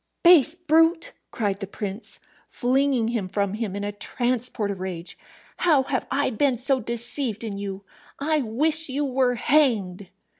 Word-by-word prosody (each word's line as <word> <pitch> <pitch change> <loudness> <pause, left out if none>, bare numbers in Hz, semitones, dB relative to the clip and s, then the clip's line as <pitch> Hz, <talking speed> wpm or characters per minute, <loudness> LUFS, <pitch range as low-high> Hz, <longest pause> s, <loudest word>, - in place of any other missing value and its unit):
"Base 335 -3 +7
brute!" 330 0 +2 0.2
cried 200 -4 -2
the 195 - -5
prince, 205 +2 -6 0.3
flinging 255 -2 +1
him 220 -6 -2
from 200 0 -1
him 215 -3 -3
in 200 - -4
a 205 - -2
transport 240 0 -2
of 195 - -6
rage. 180 -2 -5 0.4
"How 305 -6 +3
have 260 -1 -2
I 285 -1 0
been 255 +2 +1
so 265 +2 +2
deceived 235 0 -2
in 205 -3 -5
you? 200 -1 -6 0.3
I 305 +2 0
wish 295 +6 +1
you 285 +3 -1
were 255 -2 +1
hanged!" 215 -9 +1
245 Hz, 155 wpm, -24 LUFS, 205-280 Hz, 0.4 s, Base